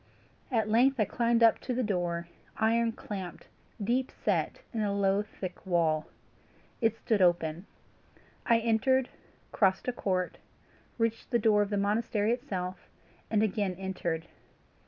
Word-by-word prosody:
At 220 Hz, -4 st, +1 dB
length 250 Hz, +4 st, +3 dB
I 215 Hz, -, +4 dB
came 235 Hz, +2 st, +2 dB
up 230 Hz, -, +6 dB
to 250 Hz, -, -3 dB
the 255 Hz, -, 0 dB
door, 175 Hz, -5 st, -1 dB, 0.3 s
iron 230 Hz, +1 st, +2 dB
clamped, 195 Hz, -5 st, -7 dB, 0.4 s
deep 250 Hz, +5 st, +1 dB
set -, -, -1 dB
in 225 Hz, -, -1 dB
a 205 Hz, -1 st, 0 dB
low 200 Hz, 0 st, +2 dB
thick 195 Hz, -3 st, -8 dB
wall. 165 Hz, -4 st, +1 dB, 0.7 s
It 225 Hz, -1 st, +2 dB
stood 220 Hz, -3 st, 0 dB
wide 185 Hz, -, +7 dB
open. 170 Hz, +1 st, -2 dB, 0.8 s
I 235 Hz, -, +4 dB
entered, 235 Hz, +3 st, +2 dB, 0.4 s
crossed 190 Hz, +1 st, +2 dB
a 250 Hz, -, 0 dB
court, 185 Hz, -5 st, -1 dB, 0.6 s
reached 230 Hz, -1 st, -1 dB
the 240 Hz, -, +3 dB
door 210 Hz, -2 st, +4 dB
of 205 Hz, -, 0 dB
the 205 Hz, -, 0 dB
monastery 210 Hz, +1 st, +1 dB
itself, 190 Hz, -8 st, -4 dB, 0.4 s
and 215 Hz, -1 st, +2 dB
again 200 Hz, -3 st, 0 dB
entered. 175 Hz, -4 st, -3 dB
210 Hz, 145 wpm, -30 LUFS, 185-230 Hz, 0.8 s, wide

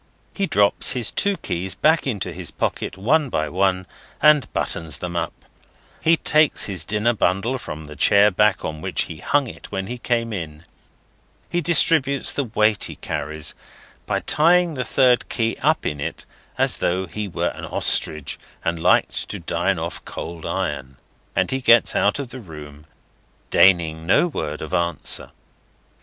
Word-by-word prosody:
He 195 Hz, -1 st, -1 dB
drops 100 Hz, -, +3 dB
his 120 Hz, -4 st, 0 dB
two 200 Hz, -1 st, 0 dB
keys 95 Hz, -, -4 dB
back 155 Hz, -1 st, +2 dB
into 100 Hz, -8 st, -3 dB
his 90 Hz, 0 st, -4 dB
pocket 95 Hz, -, -3 dB
one 140 Hz, +8 st, +2 dB
by 80 Hz, -7 st, -1 dB
one, 95 Hz, 0 st, 0 dB, 0.3 s
and 150 Hz, -2 st, +4 dB
buttons 80 Hz, -2 st, -2 dB
them 90 Hz, -1 st, -6 dB
up; -, -, -1 dB, 0.7 s
he 165 Hz, +1 st, +4 dB
takes 155 Hz, -1 st, +2 dB
his 90 Hz, -5 st, -2 dB
dinner 105 Hz, +4 st, +1 dB
bundle 110 Hz, +6 st, 0 dB
from 80 Hz, -8 st, -8 dB
the 75 Hz, 0 st, -11 dB
chair 100 Hz, +6 st, +5 dB
back 105 Hz, +2 st, +2 dB
on 80 Hz, 0 st, -5 dB
which -, -, -1 dB
he 80 Hz, -, -9 dB
hung 145 Hz, -, +1 dB
it 120 Hz, -, -11 dB
when 95 Hz, -1 st, -3 dB
he 125 Hz, +5 st, -6 dB
came 115 Hz, -2 st, -1 dB
in; 80 Hz, -4 st, -7 dB, 0.9 s
he 175 Hz, -, 0 dB
distributes 150 Hz, -4 st, +3 dB
the 140 Hz, -, -2 dB
weight 110 Hz, -2 st, +1 dB
he -, -, -6 dB
carries, 75 Hz, +1 st, -4 dB, 0.5 s
by -, -, -1 dB
tying 170 Hz, +2 st, +4 dB
the 130 Hz, -3 st, -3 dB
third 125 Hz, -2 st, +2 dB
key 115 Hz, -1 st, -1 dB
up 155 Hz, +3 st, +1 dB
in 75 Hz, -, -2 dB
it, 70 Hz, -, -5 dB, 0.3 s
as -, -, +2 dB
though 95 Hz, +2 st, -1 dB
he 105 Hz, +5 st, -5 dB
were 90 Hz, -, -2 dB
an -, -, -8 dB
Ostrich, 75 Hz, -3 st, +1 dB, 0.3 s
and 85 Hz, 0 st, -1 dB
liked -, -, +2 dB
to -, -, -4 dB
dine -, -, -1 dB
off -, -, -5 dB
cold 85 Hz, -1 st, -7 dB
iron; 70 Hz, -8 st, -3 dB, 0.4 s
and -, -, +1 dB
he 130 Hz, 0 st, -1 dB
gets 120 Hz, -2 st, +5 dB
out 105 Hz, -, +2 dB
of 140 Hz, -4 st, -5 dB
the 130 Hz, -, -9 dB
room, 75 Hz, -6 st, -12 dB, 0.6 s
deigning 80 Hz, -4 st, +3 dB
no 135 Hz, -, +4 dB
word 80 Hz, -, -4 dB
of 80 Hz, -, -8 dB
answer. 85 Hz, -1 st, 0 dB
100 Hz, 170 wpm, -22 LUFS, 85-130 Hz, 0.9 s, chair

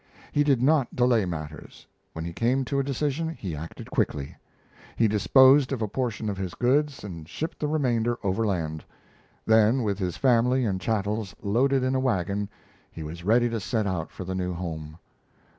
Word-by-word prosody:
He 145 Hz, -, +3 dB
did 135 Hz, -4 st, +2 dB
not 145 Hz, -2 st, +2 dB
delay 120 Hz, -4 st, +3 dB
matters. 80 Hz, -3 st, -7 dB, 0.3 s
When 80 Hz, 0 st, -5 dB
he 85 Hz, -, -5 dB
came 125 Hz, +7 st, +1 dB
to 140 Hz, +2 st, -1 dB
a -, -, +1 dB
decision, 145 Hz, +4 st, -1 dB
he 95 Hz, -, -5 dB
acted 80 Hz, +3 st, -8 dB
quickly. 70 Hz, -2 st, -1 dB, 0.6 s
He 115 Hz, -, +3 dB
disposed 130 Hz, +7 st, +5 dB
of 125 Hz, -5 st, -1 dB
a -, -, 0 dB
portion 115 Hz, 0 st, -3 dB
of 100 Hz, -2 st, -3 dB
his 95 Hz, -3 st, -4 dB
goods 140 Hz, +3 st, +1 dB
and 85 Hz, -6 st, -8 dB
shipped 160 Hz, +2 st, -5 dB
the 150 Hz, -, -1 dB
remainder 120 Hz, -6 st, +1 dB
overland; 95 Hz, -7 st, -1 dB, 0.6 s
then, 110 Hz, +3 st, +4 dB
with 100 Hz, -2 st, -1 dB
his 90 Hz, -3 st, -2 dB
family 125 Hz, +2 st, +3 dB
and 95 Hz, -3 st, -1 dB
chattels 105 Hz, -2 st, -2 dB
loaded 130 Hz, +6 st, +2 dB
in 130 Hz, +1 st, +1 dB
a 130 Hz, -, +2 dB
wagon, 100 Hz, -5 st, -1 dB, 0.4 s
he 80 Hz, -, -7 dB
was 85 Hz, +3 st, -7 dB
ready 120 Hz, +5 st, +4 dB
to 115 Hz, -1 st, -2 dB
set 110 Hz, +1 st, -1 dB
out 90 Hz, -4 st, -2 dB
for -, -, -8 dB
the 95 Hz, +1 st, -4 dB
new 90 Hz, -1 st, -2 dB
home. 80 Hz, -3 st, -6 dB
110 Hz, 180 wpm, -26 LUFS, 90-130 Hz, 0.6 s, disposed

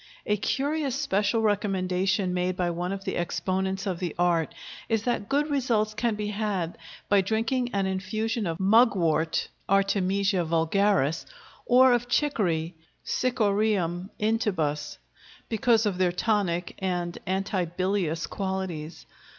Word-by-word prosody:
A 210 Hz, -, +2 dB
curious 275 Hz, +6 st, -1 dB
special 225 Hz, -5 st, +1 dB
recommendation 190 Hz, -2 st, +1 dB
made 180 Hz, 0 st, -1 dB
by 175 Hz, -1 st, 0 dB
one 175 Hz, +2 st, -3 dB
of 195 Hz, 0 st, -4 dB
the 190 Hz, -, -2 dB
exponents 190 Hz, +3 st, -1 dB
of 185 Hz, -4 st, -2 dB
the 175 Hz, -4 st, -3 dB
art 170 Hz, -2 st, +2 dB, 0.4 s
is 225 Hz, -2 st, +1 dB
that 240 Hz, -4 st, -1 dB
good 290 Hz, +2 st, +2 dB
results 230 Hz, -6 st, +1 dB
can 225 Hz, +1 st, 0 dB
be 210 Hz, 0 st, -3 dB
had 200 Hz, -5 st, -2 dB, 0.3 s
by 200 Hz, -1 st, +4 dB
drinking 225 Hz, +5 st, 0 dB
an 200 Hz, -1 st, +1 dB
infusion 210 Hz, +3 st, -2 dB
of 165 Hz, -1 st, -3 dB
mugwort 190 Hz, -7 st, +3 dB, 0.2 s
(Artemisia 195 Hz, -1 st, +2 dB
vulgaris), 165 Hz, -1 st, +1 dB, 0.4 s
or 255 Hz, +1 st, +6 dB
of 245 Hz, 0 st, 0 dB
chicory 185 Hz, -, 0 dB, 0.3 s
(Cichorium 205 Hz, -7 st, 0 dB
intybus), 185 Hz, -10 st, -1 dB, 0.5 s
because 225 Hz, 0 st, +3 dB
of 195 Hz, -3 st, -1 dB
their 180 Hz, -1 st, +3 dB
tonic 180 Hz, -3 st, 0 dB
and 175 Hz, -2 st, -2 dB
antibilious 185 Hz, -2 st, -1 dB
qualities. 190 Hz, -5 st, -4 dB
195 Hz, 125 wpm, -27 LUFS, 180-220 Hz, 0.5 s, or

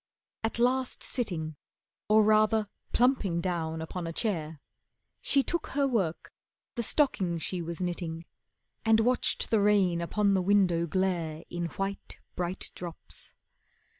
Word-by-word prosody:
At 225 Hz, -, -1 dB
last 255 Hz, +2 st, +1 dB
sitting, 165 Hz, -, -2 dB, 0.5 s
Or 215 Hz, 0 st, +6 dB
rather 215 Hz, 0 st, +4 dB, 0.2 s
plumping 235 Hz, -9 st, +2 dB
down 160 Hz, -2 st, -2 dB
upon 170 Hz, +1 st, -5 dB
a -, -, -3 dB
chair, 165 Hz, -6 st, -2 dB, 0.6 s
She 275 Hz, -, +3 dB
took 340 Hz, +3 st, -2 dB
her 280 Hz, 0 st, +1 dB
work, 195 Hz, -11 st, -1 dB, 0.4 s
the 240 Hz, -, -2 dB
stocking 205 Hz, -, +1 dB
she 175 Hz, +2 st, -2 dB
was 170 Hz, 0 st, -5 dB
knitting, 170 Hz, -2 st, -3 dB, 0.6 s
And 225 Hz, 0 st, +5 dB
watched 250 Hz, +2 st, +1 dB
the 220 Hz, -2 st, +4 dB
rain 195 Hz, -4 st, +3 dB
upon 200 Hz, +4 st, +1 dB
the 190 Hz, -, +3 dB
window 180 Hz, -3 st, +3 dB
glare 170 Hz, -3 st, -1 dB
In 175 Hz, 0 st, -2 dB
white, 195 Hz, +4 st, -4 dB, 0.2 s
bright 180 Hz, +1 st, -2 dB
drops. 175 Hz, -2 st, -7 dB
185 Hz, 135 wpm, -29 LUFS, 170-220 Hz, 0.6 s, Or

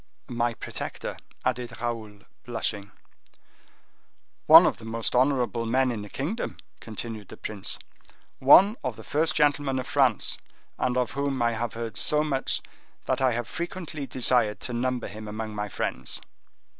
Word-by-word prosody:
"My 120 Hz, -1 st, 0 dB
protector," -, -, -5 dB, 0.3 s
added 120 Hz, -2 st, -2 dB
Raoul, 110 Hz, -4 st, -4 dB, 0.2 s
blushing. 110 Hz, -4 st, -3 dB, 1.6 s
"One -, -, +11 dB
of -, -, +1 dB
the -, -, -12 dB
most 115 Hz, 0 st, -2 dB
honorable 125 Hz, -3 st, +2 dB
men 130 Hz, +2 st, +2 dB
in 110 Hz, -3 st, -4 dB
the 105 Hz, -, -8 dB
kingdom," 165 Hz, -, -3 dB, 0.2 s
continued 110 Hz, -2 st, -6 dB
the -, -, -11 dB
prince; 105 Hz, -3 st, -4 dB, 0.6 s
"one 195 Hz, -, +7 dB
of -, -, -2 dB
the -, -, -11 dB
first 155 Hz, +2 st, +1 dB
gentlemen 145 Hz, -2 st, +2 dB
of 130 Hz, -, -2 dB
France, 130 Hz, -7 st, +2 dB, 0.4 s
and 125 Hz, 0 st, +1 dB
of 125 Hz, +2 st, +1 dB
whom 140 Hz, -1 st, -1 dB
I 115 Hz, -, +3 dB
have 115 Hz, 0 st, -3 dB
heard 115 Hz, -1 st, -5 dB
so 150 Hz, 0 st, +4 dB
much 135 Hz, -3 st, 0 dB, 0.4 s
that -, -, 0 dB
I 130 Hz, -2 st, +4 dB
have 120 Hz, 0 st, -2 dB
frequently 170 Hz, -5 st, -5 dB
desired 120 Hz, -4 st, +2 dB
to 125 Hz, -, -4 dB
number 125 Hz, 0 st, -1 dB
him 110 Hz, 0 st, -8 dB
among 110 Hz, +1 st, -5 dB
my 105 Hz, 0 st, -3 dB
friends." 65 Hz, -8 st, -3 dB
120 Hz, 155 wpm, -27 LUFS, 110-135 Hz, 1.6 s, One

